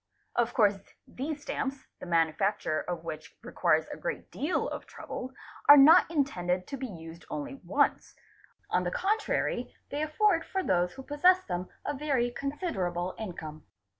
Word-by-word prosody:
Of 240 0 +1
course 205 -4 +4 0.3
these 290 +3 -5
stamps, 270 0 -3
the - - -8
manufacture 165 0 +1
of 175 -2 -5
which 155 -2 -7
requires - - +2
a - - -8
great - - -5
deal 305 +6 -1
of - - -6
trouble, 255 +1 -7 0.4
are 290 - +12
not 310 +6 +8
intended 185 - 0
to 275 - -4
be 260 0 -4
used 165 -4 -10
only 280 -2 -5
once, - - +1 0.6
on - - +2
the - - 0
contrary 435 -3 -1 0.2
they 290 - -2
afford 330 +3 +2
for 380 0 -2
those 180 - +1
who 265 - -9
possess 360 +7 +4
them 180 -1 -4 0.2
a 290 - -1
very 265 -4 0
considerable 195 - -2
income. 160 -7 -7
255 Hz, 155 wpm, -29 LUFS, 180-295 Hz, 0.6 s, are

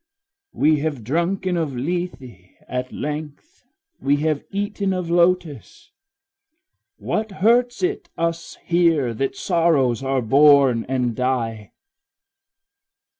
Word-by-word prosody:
We 155 0 +3
have 145 -5 -3
drunken 175 - -1
of 155 -5 -2
Lethe 130 - -5 0.2
at 125 0 -4
length, 150 - -7 0.3
we 140 +1 +2
have 150 0 -1
eaten 200 -1 -2
of 180 -2 -3
lotus; 175 - 0 1.1
What 215 -1 -3
hurts 240 - +2
it 375 +3 -2
us 165 0 -3
here 165 -8 +2
that 135 +4 -2
sorrows 160 - +1
are 135 -1 -1
born 135 -1 +5
and 125 -3 -1
die? 115 -5 -2
155 Hz, 105 wpm, -21 LUFS, 130-180 Hz, 1.1 s, born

